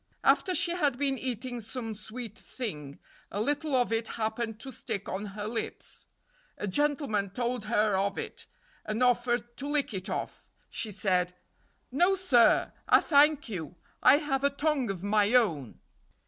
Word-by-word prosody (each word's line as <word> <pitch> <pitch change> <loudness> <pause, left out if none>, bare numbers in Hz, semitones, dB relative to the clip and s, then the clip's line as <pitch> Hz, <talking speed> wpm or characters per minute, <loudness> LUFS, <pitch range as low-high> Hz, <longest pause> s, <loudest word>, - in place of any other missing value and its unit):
After 370 - +3
she 340 - +2
had 295 -8 +1
been 270 -1 0
eating 250 -1 -4
some 225 0 -5
sweet 220 +1 -8
thing 150 - -6 0.3
a 200 - -4
little 290 +5 0
of 245 -2 +2
it 225 0 0
happened 220 0 -2
to 270 - -7
stick 200 -4 -4
on 200 +2 -3
her 205 - -3
lips. 225 +1 -5 0.5
A - - -3
gentleman 270 -4 0
told 240 +2 -2
her 210 -2 +2
of 195 +1 0
it, - - -6 0.4
and 215 +3 -1
offered 240 -1 +1
to 280 - -5
lick 290 -5 0
it 190 +1 -5
off. - - -5 0.2
She 220 - -2
said: 180 -3 0 0.6
"No, 355 +9 +4
sir, 270 -12 +4 0.2
I - - +8
thank 295 -1 +4
you; 180 -6 -5 0.3
I 275 - +7
have 275 -3 -1
a 280 - +5
tongue 280 -3 0
of 190 -2 -4
my 210 +2 +3
own." 160 - +2
235 Hz, 160 wpm, -29 LUFS, 210-275 Hz, 0.6 s, I